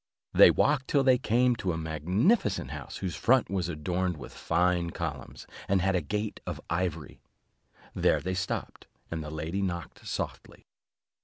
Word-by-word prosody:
They -, -, +9 dB
walked 140 Hz, -2 st, +2 dB
till 140 Hz, -2 st, +3 dB
they 130 Hz, -2 st, +5 dB
came 125 Hz, +1 st, +3 dB
to 90 Hz, -5 st, -1 dB
a -, -, -3 dB
magnificent 90 Hz, -, +1 dB
house, -, -, -7 dB
whose 95 Hz, -3 st, -3 dB
front 125 Hz, -6 st, +3 dB
was 90 Hz, -3 st, -1 dB
adorned 90 Hz, +2 st, -1 dB
with 65 Hz, -, -10 dB
fine 90 Hz, -1 st, +1 dB
columns, 80 Hz, -5 st, -6 dB, 0.2 s
and 100 Hz, 0 st, +3 dB
had 95 Hz, 0 st, +2 dB
a 90 Hz, -, +2 dB
gate 105 Hz, +7 st, -3 dB
of -, -, -4 dB
ivory. 85 Hz, -4 st, -2 dB, 0.7 s
There -, -, +3 dB
they 95 Hz, -, -3 dB
stopped, 95 Hz, +2 st, -4 dB, 0.2 s
and 80 Hz, -1 st, -3 dB
the 75 Hz, -, -6 dB
lady 80 Hz, +5 st, -3 dB
knocked 85 Hz, -4 st, -4 dB
softly. -, -, -5 dB
90 Hz, 160 wpm, -29 LUFS, 80-105 Hz, 0.7 s, They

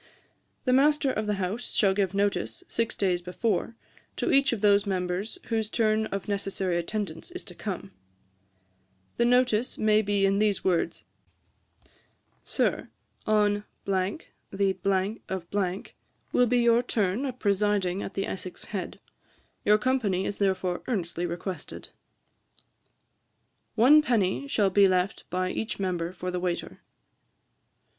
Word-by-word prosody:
'The 255 Hz, -, +3 dB
master 285 Hz, +1 st, +4 dB
of 215 Hz, 0 st, -2 dB
the 210 Hz, -, +1 dB
house 195 Hz, +5 st, -3 dB
shall 195 Hz, -3 st, +4 dB
give 195 Hz, -1 st, 0 dB
notice, 195 Hz, -, -1 dB
six 230 Hz, -1 st, -1 dB
days 180 Hz, -3 st, +1 dB
before, 195 Hz, +4 st, -1 dB, 0.4 s
to -, -, 0 dB
each 275 Hz, 0 st, +4 dB
of 230 Hz, -4 st, -2 dB
those 205 Hz, -1 st, +4 dB
members 185 Hz, -, -2 dB
whose 220 Hz, -2 st, 0 dB
turn 220 Hz, -1 st, +1 dB
of 195 Hz, -1 st, -5 dB
necessary 195 Hz, -3 st, -1 dB
attendance 175 Hz, -1 st, -3 dB
is -, -, -7 dB, 0.2 s
come. -, -, -5 dB, 1.3 s
'The 235 Hz, -, +3 dB
notice 245 Hz, -1 st, +2 dB
may 215 Hz, 0 st, +4 dB
be 200 Hz, -1 st, +1 dB
in 195 Hz, +1 st, +2 dB
these 210 Hz, -2 st, +1 dB
words: 180 Hz, -3 st, 0 dB, 1.4 s
"Sir, -, -, 0 dB, 0.4 s
On 205 Hz, -1 st, +2 dB, 0.2 s
the 195 Hz, +1 st, -1 dB
of 185 Hz, -3 st, -4 dB, 0.8 s
will 245 Hz, -, +4 dB
be 245 Hz, +1 st, +3 dB
your 235 Hz, 0 st, +4 dB
turn 220 Hz, 0 st, 0 dB
of 255 Hz, -1 st, -5 dB
presiding 200 Hz, -3 st, +1 dB
at -, -, -6 dB
the 195 Hz, -, -1 dB
Essex 185 Hz, -1 st, -6 dB
Head. 190 Hz, -4 st, -5 dB, 0.6 s
Your 210 Hz, +1 st, +5 dB
company 215 Hz, -6 st, 0 dB
is 200 Hz, -, -3 dB
therefore 190 Hz, -2 st, 0 dB
earnestly 175 Hz, -6 st, -2 dB
requested." 175 Hz, +2 st, -6 dB, 1.9 s
'One 270 Hz, +7 st, +7 dB
penny 235 Hz, -3 st, 0 dB
shall 205 Hz, -8 st, +2 dB
be 200 Hz, +1 st, +6 dB
left 185 Hz, +1 st, 0 dB
by 185 Hz, +1 st, -1 dB
each 220 Hz, -, -4 dB
member 175 Hz, -3 st, -1 dB
for 180 Hz, 0 st, -5 dB
the 180 Hz, -, -2 dB
waiter.' 175 Hz, -1 st, -3 dB
200 Hz, 130 wpm, -27 LUFS, 185-220 Hz, 1.9 s, One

